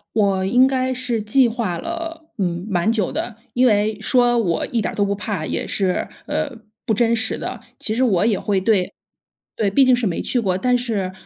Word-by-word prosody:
我 195 -3 +2
应 245 +7 +5
该 260 -1 0
是 245 -3 -2
计 240 +4 +4
划 220 -7 -2
了， 330 - -6
嗯， 175 -1 -2
蛮 180 +2 +1
久 215 -5 0
的。 230 -3 -4 0.2
因 255 +1 +3
为 210 -1 +2
说 240 +1 +3
我 175 -8 0
一 230 -2 -1
点 - - -2
儿 - - -10
都 205 - +2
不 200 0 0
怕， 200 -5 -4
也 - - -3
是， 190 -3 -1 0.2
呃， 290 - -1 0.3
不 225 - +1
真 230 +2 +2
实 225 0 -1
的， - - -5 0.2
其 220 - -2
实 250 - 0
我 210 -5 +3
也 220 -4 +2
会 200 -2 0
对 190 -2 +1 0.6
对， 205 -3 +1
毕 270 +7 +5
竟 255 - +5
是 245 -2 0
没 175 - -1
去 245 - 0
过。 185 -3 0
但 250 +3 +2
是 215 -7 -2
220 Hz, 230 characters per minute, -21 LUFS, 195-245 Hz, 0.6 s, 应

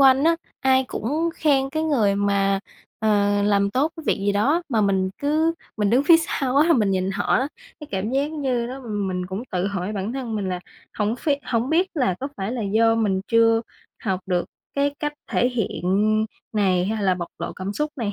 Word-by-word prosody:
quanh 270 +1 +6
á, 330 0 +4 0.2
ai 265 -1 +3
cũng 300 +9 -1
khen 275 -3 +2
cái 315 +1 -1
người 230 -11 +2
mà, 200 -1 +1 0.4
ờ, 205 -1 +2
làm 200 -1 +2
tốt 290 +7 +1
cái 320 - -9
việc - - +2
gì 205 - +3
đó 280 +13 +2
mà 230 -6 +1
mình 190 -2 +1
cứ 310 +3 +2 0.2
mình 210 -1 +1
đứng 260 +4 +3
phía 330 +2 +8
sau 275 -5 -1
á 305 +3 +5
là - - +6
mình 215 -9 +2
nhìn 190 0 0
họ 200 +1 -2
á, 265 +3 +1 0.3
cái 300 - -8
cảm 200 +3 -2
giác 280 +3 0
như 260 -6 -1
đó 260 +2 -7
mình 195 -6 -3
cũng 190 +5 -4
tự 180 +1 0
hỏi 200 0 -3
bản 205 +3 -3
thân 250 -4 -4
mình 195 -3 -2
là 180 -1 -3 0.4
hổng 210 +2 +1
ph 305 - -5 0.2
hổng 235 +3 0
biết 350 +4 +3
là 250 - +1
có 275 - -3
phải 195 +4 -3
là 240 -3 -3
do 225 +3 +3
mình 200 -4 +1
chưa 230 -1 +4 0.4
học 190 -3 0
được 180 -2 0 0.3
cái 285 0 +1
cách 295 -1 -2 0.2
thể 245 - +2
hiện 240 -5 -2 0.7
này 185 -4 +2
hay 215 0 -2
là 190 -2 +3
bộc 175 -1 -5
lộ - - -4
cảm 190 +2 -5
xúc 300 +7 -2
này 220 -6 -2
225 Hz, 220 wpm, -23 LUFS, 200-275 Hz, 0.7 s, phía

